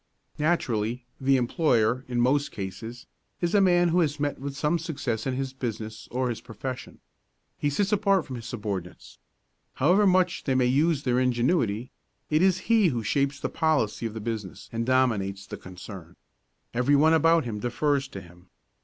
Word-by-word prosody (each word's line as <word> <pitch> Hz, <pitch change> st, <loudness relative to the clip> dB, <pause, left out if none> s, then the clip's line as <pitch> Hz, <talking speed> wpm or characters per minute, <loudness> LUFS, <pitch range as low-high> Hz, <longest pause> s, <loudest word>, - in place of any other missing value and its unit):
Naturally, 125 Hz, -7 st, 0 dB
the 135 Hz, 0 st, +3 dB
employer, 125 Hz, -2 st, +1 dB
in 120 Hz, -1 st, -2 dB
most 140 Hz, +4 st, +2 dB
cases, 110 Hz, +5 st, -7 dB, 0.3 s
is 175 Hz, -1 st, -1 dB
a 205 Hz, -, +5 dB
man 175 Hz, -2 st, +4 dB
who 175 Hz, +2 st, +2 dB
has 150 Hz, -3 st, 0 dB
met 145 Hz, 0 st, -1 dB
with 140 Hz, 0 st, -5 dB
some 150 Hz, +4 st, +1 dB
success 140 Hz, -8 st, -3 dB
in 130 Hz, -, -1 dB
his 135 Hz, 0 st, -3 dB
business 110 Hz, -3 st, -5 dB
or 125 Hz, +1 st, -1 dB
his 115 Hz, -1 st, -4 dB
profession. 120 Hz, +2 st, -7 dB, 0.6 s
He 145 Hz, -, +1 dB
sits 200 Hz, +8 st, 0 dB
apart 195 Hz, -3 st, +2 dB
from 130 Hz, -3 st, -6 dB
his 115 Hz, -, -8 dB
subordinates. 100 Hz, -6 st, -6 dB, 0.6 s
However 185 Hz, +9 st, +4 dB
much 185 Hz, -2 st, +2 dB
they 135 Hz, -, +1 dB
may 130 Hz, -1 st, +3 dB
use 145 Hz, +4 st, +2 dB
their 125 Hz, -1 st, +2 dB
ingenuity, 125 Hz, -, +1 dB, 0.4 s
it 155 Hz, +1 st, +3 dB
is 185 Hz, -1 st, +3 dB
he 225 Hz, -4 st, +4 dB
who 120 Hz, -8 st, -1 dB
shapes 140 Hz, +5 st, 0 dB
the -, -, -2 dB
policy 150 Hz, -9 st, 0 dB
of 110 Hz, -, -9 dB
the 110 Hz, -, -5 dB
business 105 Hz, -4 st, -5 dB
and 115 Hz, +1 st, -3 dB
dominates 105 Hz, -7 st, +1 dB
the -, -, -7 dB
concern. 90 Hz, -1 st, -10 dB, 0.6 s
Every 125 Hz, +4 st, +3 dB
one 155 Hz, +3 st, +5 dB
about 165 Hz, -1 st, +4 dB
him 110 Hz, -3 st, -4 dB
defers 140 Hz, +4 st, 0 dB
to 95 Hz, -, -8 dB
him. 90 Hz, +1 st, -17 dB
130 Hz, 175 wpm, -26 LUFS, 115-155 Hz, 0.6 s, a